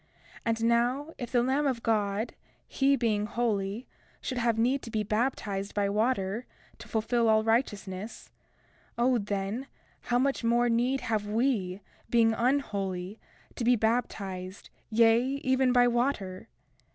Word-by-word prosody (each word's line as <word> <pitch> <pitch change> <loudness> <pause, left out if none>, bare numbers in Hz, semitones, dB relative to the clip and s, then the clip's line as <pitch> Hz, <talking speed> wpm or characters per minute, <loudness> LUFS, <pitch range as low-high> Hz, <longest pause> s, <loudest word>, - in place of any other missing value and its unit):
31:5 - - -37 0.4
And 225 0 0
now, 245 +7 +1
if 245 -2 -5
the 245 -2 +3
Lamb 275 +3 +1
of 245 -4 -2
God, 210 0 0 0.3
he 275 0 +2
being 215 -5 0
holy, 215 -1 -1 0.3
should 255 -2 -3
have 235 -2 +1
need 255 +4 +2
to - - -9
be 215 -1 -1
baptized 210 -3 -2
by 200 -1 +1
water, 215 0 0 0.3
to - - -11
fulfil 230 +1 +1
all 220 0 +4
righteousness, 215 -3 -2 0.7
O 245 +1 +3
then, 205 +5 -3 0.3
how 245 - 0
much 270 0 0
more 240 +1 +3
need 245 +3 +1
have 220 -4 -1
we, 210 -4 0 0.3
being 230 -1 +4
unholy, 205 -7 -1 0.4
to - - -3
be 245 +1 +5
baptized, 200 -5 -2 0.2
yea, 225 +1 +5 0.2
even 260 0 +3
by 245 0 +5
water! 235 -7 -1
230 Hz, 140 wpm, -29 LUFS, 205-245 Hz, 0.7 s, be